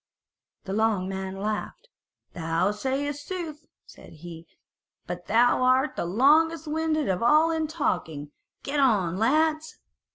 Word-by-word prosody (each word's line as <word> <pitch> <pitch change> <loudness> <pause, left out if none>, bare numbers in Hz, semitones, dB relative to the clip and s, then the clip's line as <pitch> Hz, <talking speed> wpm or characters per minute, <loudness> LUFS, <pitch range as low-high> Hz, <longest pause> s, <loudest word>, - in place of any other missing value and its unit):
The 190 - -5
long 215 -3 +1
man 190 0 -5
laughed; 215 - -4 0.5
"Thou 165 +3 0
sayest 275 +6 -3
sooth," 315 -5 -6 0.2
said - - -15
he, 165 +1 -11 0.6
"but 175 0 -7
thou 240 +3 +3
art 255 +3 +2
the - - -2
longest 305 - +3
winded 310 -1 -1
of 185 -2 -1
all 305 +7 +4
in 320 -1 -1
talking: 160 - -3 0.3
get 285 +1 -2
on, 200 -10 +2
lads." 310 +6 +1
255 Hz, 130 wpm, -26 LUFS, 190-310 Hz, 0.6 s, all